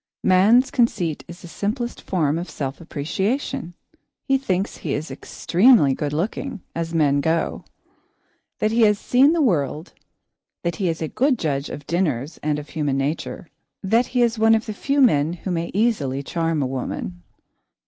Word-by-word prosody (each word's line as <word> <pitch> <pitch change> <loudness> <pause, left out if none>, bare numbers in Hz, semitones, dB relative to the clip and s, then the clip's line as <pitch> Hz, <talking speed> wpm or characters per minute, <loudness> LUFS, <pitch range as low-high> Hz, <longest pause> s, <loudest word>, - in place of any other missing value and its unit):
Man's 210 +8 +5
conceit 185 - 0
is 175 +2 -11
the - - -8
simplest 230 +7 -3
form 160 -4 0
of 175 - -6
self 135 +2 -5
appreciation. 175 - -3 0.5
He 270 - +2
thinks 195 -7 -2
he 145 - -3
is 150 +2 -5
extremely 185 - +3
good 145 +2 -3
looking, 205 - -3
as 165 0 -3
men 145 -4 +2
go; 160 +2 -1 0.9
that 215 - 0
he 230 +1 +2
has 210 -2 +5
seen 265 +8 +4
the 330 -3 +2
world; 160 - 0 0.7
that 170 -2 -2
he 185 -3 0
is 165 0 -3
a - - -1
good 260 - +1
judge 140 -6 -2
of 145 - -8
dinners 155 -5 -1
and 150 -1 0
of 150 0 -8
human 145 -4 -1
nature; 145 +4 -3 0.4
that 225 +5 +2
he 245 -1 +2
is 230 -1 0
one 225 0 +5
of 220 - -1
the 215 - -4
few 280 +7 0
men 160 - +4
who 180 +2 -5
may 170 -1 -2
easily 150 - 0
charm 165 0 -1
a - - 0
woman. 125 -9 -4
170 Hz, 170 wpm, -22 LUFS, 150-225 Hz, 0.9 s, Man's